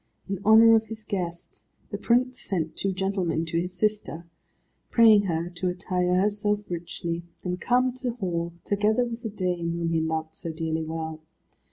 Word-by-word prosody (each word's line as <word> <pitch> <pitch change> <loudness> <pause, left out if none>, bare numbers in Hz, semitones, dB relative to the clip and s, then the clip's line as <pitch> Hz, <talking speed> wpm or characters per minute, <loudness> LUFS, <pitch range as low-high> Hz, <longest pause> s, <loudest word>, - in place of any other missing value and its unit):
In 195 -2 -3
honour 225 +2 +8
of 220 0 +1
his 220 0 -7
guest, 175 -5 -5 0.3
the - - -2
prince 250 +1 +2
sent 165 -5 -2
two 195 - -1
gentlemen 190 -4 -1
to 165 +1 -1
his 180 +1 -4
sister, 210 -5 -1 0.6
praying 220 -3 +6
her 170 -1 -2
to 180 +1 -3
attire 180 0 0
herself 205 +2 +1
richly, 170 0 -4 0.2
and 180 0 -3
come 250 +1 +2
to 250 -2 -2
hall, 170 -6 -2
together 210 +4 +2
with 235 0 -6
the 225 - -4
dame 180 -4 -2
whom 170 -1 -1
he 165 - +2
loved 160 0 -2
so 165 0 -5
dearly 160 0 -2
well. 160 0 -5
180 Hz, 170 wpm, -26 LUFS, 170-215 Hz, 0.6 s, honour